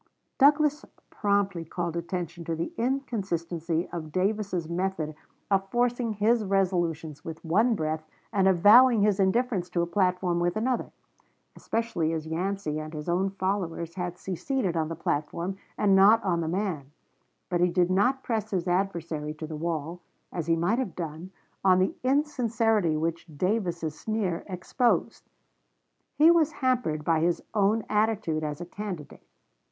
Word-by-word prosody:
Douglas 295 +1 +4 0.3
promptly 200 -4 0
called 170 +1 -4
attention 170 -1 -4
to 165 - -2
the 170 - -4
inconsistency 180 - -2
of 155 -3 -5
Davis's 190 -2 -1
method 170 -2 -2 0.4
of 195 0 +2
forcing 240 0 0
his 215 +3 +2
resolutions 175 -6 -1
with 165 0 -8
one 220 +8 +3
breath 155 -3 -2 0.3
and 195 -2 +3
avowing 215 +6 +7
his 205 -1 +2
indifference 195 -1 +1
to 175 -1 0
a - - +1
platform 180 -1 +1
with 175 +3 0
another, 245 +2 -1 0.6
especially 205 -9 -1
as 160 -1 -3
Yancey 165 -1 -2
and 155 +1 -7
his 150 +1 -6
own 180 +3 +1
followers 185 -4 -2
had 180 -1 -4
seceded 190 +1 -2
on 160 -1 0
the 165 - -4
platform 170 +4 -2 0.2
and 200 -2 +4
not 210 +4 +6
on 175 -3 +1
the 160 - -2
man; 170 -6 -2 0.6
but 175 -1 0
he 180 - +4
did 175 0 +2
not 250 +8 +2
press 220 -2 -2
his 185 -4 -2
adversary 170 -5 -1
to 155 - -6
the 155 0 -6
wall, 165 +1 -3 0.3
as 170 -3 -3
he 165 - +3
might 175 +9 +1
have 255 -8 -3
done, 165 +1 -6 0.3
on 185 -1 +5
the 185 +1 +2
insincerity 230 - +1
which 165 +2 -2
Davis's 175 -4 -1
sneer 210 -6 -2
exposed. 205 +6 -1 0.9
He 315 +3 +7
was 320 -2 +3
hampered 250 - 0
by 165 0 +2
his 170 +1 0
own 210 +1 +2
attitude 210 -7 0
as 150 -1 -3
a 175 - -5
candidate. 180 -4 -7
185 Hz, 150 wpm, -27 LUFS, 165-215 Hz, 0.9 s, avowing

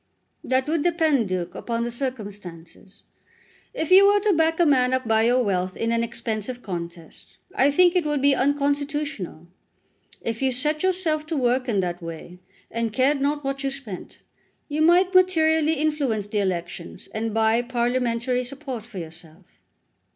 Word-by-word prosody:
"That 260 +1 0
would 315 0 0
depend, 310 - +2
Duke, 180 -2 -3
upon 235 -1 -3
the 240 - -3
circumstances. 205 -8 -7 0.7
If 320 +3 -4
you 390 +2 +8
were 410 0 +5
to 415 -1 +2
back 325 0 +1
a 345 - +5
man 255 -3 +3
up 260 -2 -3
by 220 0 +3
your 245 +2 +3
wealth 185 -3 -1
in 230 0 -1
an 230 0 +1
expensive 235 +1 -4
contest, 170 -3 -8 0.2
I 375 -9 +3
think 350 +5 +4
it 360 - +3
would 295 -1 -1
be 280 +1 +4
unconstitutional. 285 - -1 0.7
If 225 +1 -4
you 265 - +2
set 300 +5 -1
yourself 345 -5 0
to 320 -1 -2
work 250 0 +1
in 200 -4 +2
that 175 0 -3
way, 165 +2 -9 0.3
and 230 -1 -2
cared 270 +5 +2
not 290 +1 0
what 275 0 -3
you 275 - 0
spent, 265 -9 -8 0.5
you 300 +1 -2
might 355 +3 +4
materially 320 -4 +4
influence 290 -9 -1
the 210 0 -2
elections, 175 -2 -4
and 225 +1 -2
buy 225 +2 +2
parliamentary 245 0 -1
support 255 -3 -7
for 235 -5 -11
yourself." 165 +1 -11
255 Hz, 165 wpm, -24 LUFS, 215-300 Hz, 0.7 s, you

